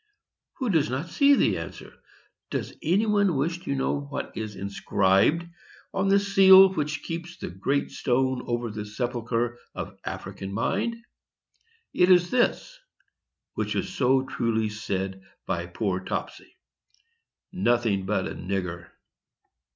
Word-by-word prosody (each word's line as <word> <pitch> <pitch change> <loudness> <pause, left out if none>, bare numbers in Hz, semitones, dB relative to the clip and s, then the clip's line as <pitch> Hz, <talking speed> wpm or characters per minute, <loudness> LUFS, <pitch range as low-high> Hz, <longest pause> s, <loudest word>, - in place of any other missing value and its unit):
Who 255 -5 -2
does 155 -4 +2
not 135 +7 -3
see 280 - +5
the - - +2
answer? - - -9 0.6
Does - - -3
any 190 +7 +2
one 205 -5 +2
wish 165 +5 -1
to 140 - -1
know 135 +1 0
what 140 0 -6
is 110 -2 -5
inscribed 100 - +2 0.5
on 195 0 0
the 195 +1 +5
seal 195 -1 +7
which 150 -3 -2
keeps 170 +2 -6
the - - -6
great 135 +11 -1
stone 130 0 0
over 120 -1 -2
the 105 0 -5
sepulchre 120 +1 -2 0.2
of - - -6
African 95 0 -6
mind? 205 - -1 1.0
It 180 - +4
is 175 -1 +5
this;—which - - -3
was - - -2
so 130 0 +3
truly 115 -4 -1
said 95 -2 -4 0.2
by 85 0 -2
poor 95 +1 -2
Topsy,—"NOTHING 120 - -4
BUT 100 -2 0
A - - -5
NIGGER!" 90 -2 -4
130 Hz, 130 wpm, -26 LUFS, -, 1.0 s, seal